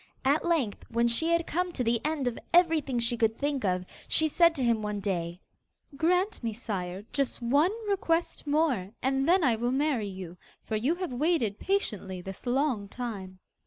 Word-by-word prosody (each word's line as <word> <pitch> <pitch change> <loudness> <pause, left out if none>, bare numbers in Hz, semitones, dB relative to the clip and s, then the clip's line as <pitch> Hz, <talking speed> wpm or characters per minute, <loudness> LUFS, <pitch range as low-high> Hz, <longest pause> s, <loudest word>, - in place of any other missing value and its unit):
At 285 +4 +3
length, 315 -12 0
when 235 +1 +2
she 235 +8 +1
had 335 0 +2
come 360 +3 -1
to 255 - -1
the 230 0 +1
end 300 -4 -1
of 240 - -2 0.2
everything 320 -7 +3
she 235 0 +1
could 225 -1 +1
think 285 -3 -1
of, 185 -2 0 0.2
she 315 - +4
said 335 +2 +4
to 270 - -2
him 230 -2 +2
one 210 -1 -3
day: 175 -3 -2 0.6
'Grant 360 - +1
me, 225 -1 -1
Sire, 195 -4 -4
just 275 -2 -1
one 280 +8 +3 0.2
request 345 -6 0
more, 290 - +1
and 270 +3 +1
then 365 0 +5
I 245 -5 +4
will 240 +2 -1
really 255 +2 +1
marry 275 -8 +1
you; 185 -3 -8 0.3
for 220 - -3
you 255 +10 +1
have 355 -6 -4
waited 250 - +1
patiently 210 - -2
this 195 +6 -8
long 250 -5 +1
time. 200 -5 -6
250 Hz, 190 wpm, -29 LUFS, 210-315 Hz, 0.6 s, then